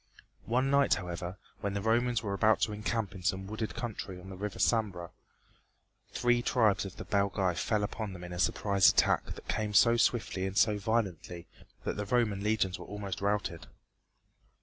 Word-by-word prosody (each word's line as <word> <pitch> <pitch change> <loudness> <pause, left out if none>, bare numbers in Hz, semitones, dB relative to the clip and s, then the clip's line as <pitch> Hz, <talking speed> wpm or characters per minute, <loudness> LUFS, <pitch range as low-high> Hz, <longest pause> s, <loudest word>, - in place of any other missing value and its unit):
One 130 +4 +1
night, 140 0 +4
however, 90 0 -5 0.2
when 100 0 -3
the 100 - -1
Romans 120 +1 +1
were 100 -2 -2
about 110 +3 +3
to 110 -2 +1
encamp 105 0 -2
in 95 - -9
some 95 +2 -1
wooded 110 +2 -4
country 100 -5 -5
on 95 +2 -11
the - - -7
River 100 +1 -5
Sambre, 100 -7 0 1.0
three 120 -1 +2
tribes 110 -5 +2
of 95 -2 -8
the - - -8
Belgæ 100 -3 +1
fell 105 +4 0
upon 105 -1 -4
them 90 -1 -9
in 90 0 -7
a 90 - -5
surprise 100 0 +4
attack - - +3
that - - -13
came 105 -1 -2
so 115 +5 +6
swiftly 110 -5 +1
and 95 +1 -5
so 105 -1 +3
violently 95 -6 -2 0.4
that - - -3
the 105 - -2
Roman 110 -4 +1
legions 105 -4 0
were - - -9
almost 100 -3 -5
routed. 100 -5 -1
105 Hz, 180 wpm, -31 LUFS, 95-110 Hz, 1.0 s, so